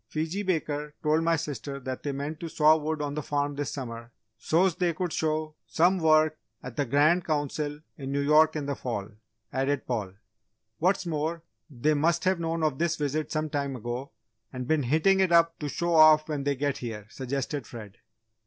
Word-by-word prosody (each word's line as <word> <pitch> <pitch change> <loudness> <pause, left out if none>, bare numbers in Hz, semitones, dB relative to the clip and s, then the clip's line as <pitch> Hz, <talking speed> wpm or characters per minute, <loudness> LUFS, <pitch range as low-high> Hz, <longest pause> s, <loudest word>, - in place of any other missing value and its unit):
"Fiji 160 - -2
Baker 150 -5 -2
told 155 +1 +3
my 165 0 +3
sister 145 -3 -5
that 130 -1 -5
they 145 - -2
meant 145 +3 -4
to 165 - -5
'saw 155 0 +5
wood' 155 -1 -2
on 145 -1 -3
the 150 - -3
farm 145 0 -1
this 145 0 -3
summer, 120 -3 -7 0.2
so's 170 - +2
they 175 -3 +1
could 180 -1 -2
show 155 0 -1
'some' 180 +3 +3
work 155 -1 +3 0.2
at 125 -2 -8
the 145 - 0
Grand 155 +7 +3
Council 150 -2 -2 0.2
in 135 -1 -5
New 140 - 0
York 155 +2 +4
in 150 -2 -2
the 140 - -1
fall," 115 -7 -4 0.4
added 135 +2 0
Paul. 105 -7 -3 0.7
"What's 185 +3 +2
more, 160 +1 -2 0.3
they 145 +2 +1
must 165 +3 +1
have 185 -1 +2
known 165 0 -2
of 150 -4 0
this 170 0 +1
visit 150 0 -2
some 155 -1 -2
time 140 -2 -2
ago, 120 +3 -5 0.4
and 125 -1 -5
been 155 0 +2
hitting 160 +9 +3
it 190 -2 +3
up 165 -1 +4
to 150 - -3
show 170 +4 -1
off 155 -1 +7
when 145 -3 -3
they 140 0 +1
get 140 +1 -1
here," 110 -4 -6
suggested 135 0 -4
Fred. 105 -5 -10
150 Hz, 195 wpm, -27 LUFS, 140-160 Hz, 0.7 s, off